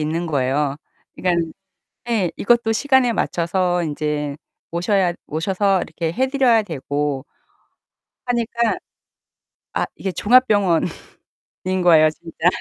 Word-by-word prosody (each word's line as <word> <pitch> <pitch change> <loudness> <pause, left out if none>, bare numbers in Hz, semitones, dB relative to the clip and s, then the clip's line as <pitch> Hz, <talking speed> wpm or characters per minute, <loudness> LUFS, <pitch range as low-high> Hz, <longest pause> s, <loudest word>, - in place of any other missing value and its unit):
있는 160 +3 -1
거예요. 140 0 0 0.4
그러니까는 170 -3 0 0.6
예 200 -7 +1
이것도 235 0 +2
시간에 260 0 +3
맞춰서 175 -2 0
인제 150 -2 -2 0.3
모셔야 180 +1 +1
모셔서 190 +4 0
이렇게 165 -2 -3
해 260 +6 +1
드려야 260 -4 +3
되고 145 -4 -3 1.0
하니까 235 -1 0 1.0
아 - - +1
이게 190 - -3
종합병원인 205 -7 +3 1.0
거예요 160 -3 +6
진짜. 165 +1 -3
175 Hz, 250 characters per minute, -21 LUFS, 155-220 Hz, 1.0 s, 거예요